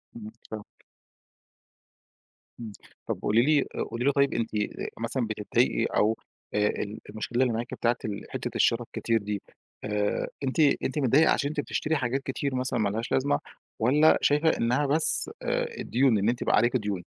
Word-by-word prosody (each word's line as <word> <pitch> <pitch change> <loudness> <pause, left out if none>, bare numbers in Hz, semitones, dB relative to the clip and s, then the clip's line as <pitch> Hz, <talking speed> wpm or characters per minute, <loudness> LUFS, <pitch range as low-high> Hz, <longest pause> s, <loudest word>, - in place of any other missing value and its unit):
امم، 110 -2 -8 0.2
فاهمِك. 110 -1 -6 1.9
امم، 115 -2 -6 0.4
طَب - - -3
قولي 110 +3 +3
لي 145 +3 +4 0.3
قولي 120 +2 -3
لي 140 - +5
طيب 140 0 +2
أنتِ 115 -1 -1 0.5
مثلًا 115 +1 -1
بتضايقي 105 -1 +1
أو 110 +2 +1 0.4
آآ، 105 0 +2
ال 105 +1 -3
المشكلة 110 +4 -2
اللي 125 - +1
معاكِ 115 +2 -4
بتاعة 120 0 +1
ال 100 -2 -4
حتة - - -4
الشرا 115 +1 +3
الكتير 115 0 -1
دي 100 -1 -3 0.4
آآ، 105 -1 -1 0.2
أنتِ 130 +3 -2 0.2
أنتِ 140 +3 -1
متضايقة 140 +4 +4
عشان 140 - +1
أنتِ 155 - -4
بتشتري 155 +2 -1
حاجات 135 -1 -1
كتير 135 0 -2
مثلًا 125 -1 -1
ما 105 -2 +2
لهاش 110 +3 -4
لازمة، 140 +2 +2 0.4
والَّا 145 +7 +5
شايفة 150 +3 +3
إنها 125 +5 +1
بس 155 - +1
آآ، - - 0
الديون، 125 -2 +2
إن 100 +2 +2
أنتِ 120 +1 -1
بقى - - +3
عليكِ 120 +2 +3
ديون؟ 105 -5 -3
120 Hz, 170 wpm, -27 LUFS, 110-140 Hz, 1.9 s, لي